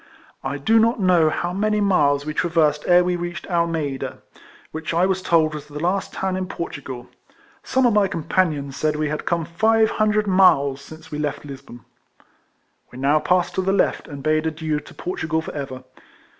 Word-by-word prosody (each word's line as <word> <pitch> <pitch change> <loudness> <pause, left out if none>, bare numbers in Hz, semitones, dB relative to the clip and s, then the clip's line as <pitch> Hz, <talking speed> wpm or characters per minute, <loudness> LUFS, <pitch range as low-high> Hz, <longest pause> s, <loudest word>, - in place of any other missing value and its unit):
I 135 +1 -3
do 220 +11 +3
not 230 +1 +2
know 180 -5 +4
how 175 +3 -2
many 210 +2 +1
miles 145 -8 +2
we 155 - -3
traversed 155 -3 +1
ere 180 0 +6
we 180 0 0
reached 175 +1 -5
Almeida, 165 -6 -2 0.5
which 160 +1 -4
I 175 +2 +4
was 190 0 0
told 160 -3 +2
was 150 -1 -7
the 150 0 -9
last 180 +4 -1
town 190 -1 -2
in 185 0 -3
Portugal: 135 -8 -6 0.6
some 260 -1 +1
of 240 - +4
my 205 -2 +4
companions 155 -5 -1
said 155 +1 0
we 150 0 -1
had 150 - -4
come 170 -2 0
five 220 +6 +2
hundred 215 0 +1
miles 145 -8 +4
since 155 +2 -13
we 150 - -4
left 150 0 -3
Lisbon. 135 -4 -10 1.1
We 125 - -11
now 140 +3 +3
passed 180 +3 +1
to 190 - 0
the 190 +1 0
left, 200 - +1
and 140 -2 -8
bade 155 +1 +1
adieu 155 -1 -2
to - - -14
Portugal 160 -3 -2
for - - -7
ever. 135 -3 -6
160 Hz, 185 wpm, -22 LUFS, 150-185 Hz, 1.1 s, ere